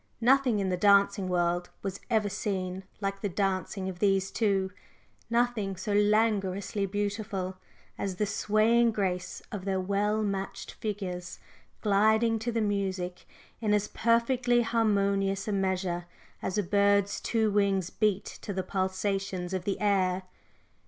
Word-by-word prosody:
Nothing 255 -1 +4
in 195 -2 0
the 180 - 0
dancing 200 0 +4
world 175 0 0
was 195 0 -4
ever 220 -3 +2
seen 190 -2 -3 0.2
like 195 0 -2
the 205 - -1
dancing 190 0 -1
of 185 -2 -6
these 195 -1 +2
two 195 -4 +1 0.6
nothing 235 -4 +1
so 190 +3 -3
languorously 205 -2 +2
beautiful 205 -2 -3 0.4
as 195 -2 -2
the 210 - 0
swaying 215 +3 +3
grace 185 -3 -2
of 205 -4 -5
their 190 -1 0
well 205 +3 0
matched 195 -1 -3
figures 185 -5 -5 0.4
gliding 220 +2 +3
to 235 +2 -2
the 230 -1 0
music 190 -3 -2 0.3
in 210 -2 +2
as 210 0 0
perfectly 240 +1 +2
harmonious 200 -3 +1
a - - 0
measure 185 -3 -1 0.3
as 190 - -2
a 205 - +2
bird's 200 +1 +2
two 220 -2 +1
wings 195 -3 +1
beat 210 -3 +1
to 200 - -7
the 190 0 -2
pulsations 190 -1 -2
of 185 -1 -2
the 200 - -1
air. 190 -3 +1
200 Hz, 140 wpm, -29 LUFS, 190-215 Hz, 0.6 s, Nothing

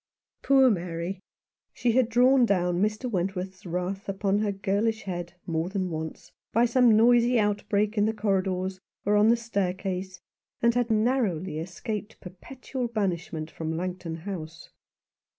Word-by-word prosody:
Poor 270 -2 +5
Mary! 175 0 -3 0.5
She 240 - +1
had 245 0 +3
drawn 250 +2 +5
down 180 -5 +1
Mr. 215 +4 0
Went 190 -3 -1
worth's 185 0 -6
wrath 180 +3 -3
upon 195 +1 0
her 210 -1 0
girlish 205 +3 -1
head 175 -2 -5
more 165 +1 -1
than 190 -2 -2
once, 160 0 -6 0.2
by 235 +2 +4
some 235 -2 +5
noisy 240 +1 +5
outbreak 210 0 0
in 205 - +4
the 220 - 0
corridors 190 -2 -1 0.3
or 205 +1 +3
on 210 +1 +5
the 235 +1 +5
staircase, 190 -4 -3 0.4
and 235 0 +3
had 245 -1 0
narrowly 215 - +1
escaped 205 +5 -5
perpetual 250 +7 -6
banishment 170 -7 -3
from 160 0 -4
Langton 180 -2 -4
House. 165 -4 -7
200 Hz, 145 wpm, -27 LUFS, 180-225 Hz, 0.5 s, Poor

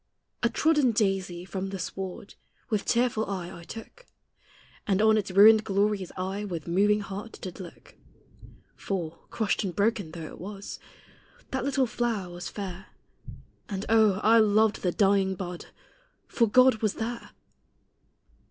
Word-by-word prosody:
A 235 - +3
trodden 295 -1 +2
daisy, 190 -5 -1
from 190 0 -4
the 195 - -5
sward, 190 +2 -6 0.4
With 210 -2 0
tearful 235 -2 +1
eye 185 -3 -5
I 170 - -10
took, 230 - -11 0.8
And 195 -2 +2
on 220 0 +5
its 210 -3 -1
ruined 215 +3 +7
glories 200 -2 0
I, 190 +3 -3
With 175 -6 -5
moving 205 +4 +3
heart, 200 +3 -7
did 185 0 -8
look; 180 -3 -11 0.8
For, 170 -5 -4
crushed 220 -2 -1
and 185 -4 -4
broken 205 -4 +1
though 165 -2 -6
it - - -10
was, 200 +1 -7 0.7
That 265 -1 -2
little 275 -1 +2
flower 225 -6 -2
was 175 0 -6
fair; 190 -2 -7 0.8
And 195 -1 -4
oh! 220 -2 +5
I 225 +1 +6
loved 215 0 +3
the 180 - +1
dying 195 0 +2
bud, 180 -1 -6 0.6
For 230 - +2
God 255 +2 +6
was 215 -2 -1
there! 235 +1 -5
200 Hz, 145 wpm, -27 LUFS, 190-220 Hz, 0.8 s, ruined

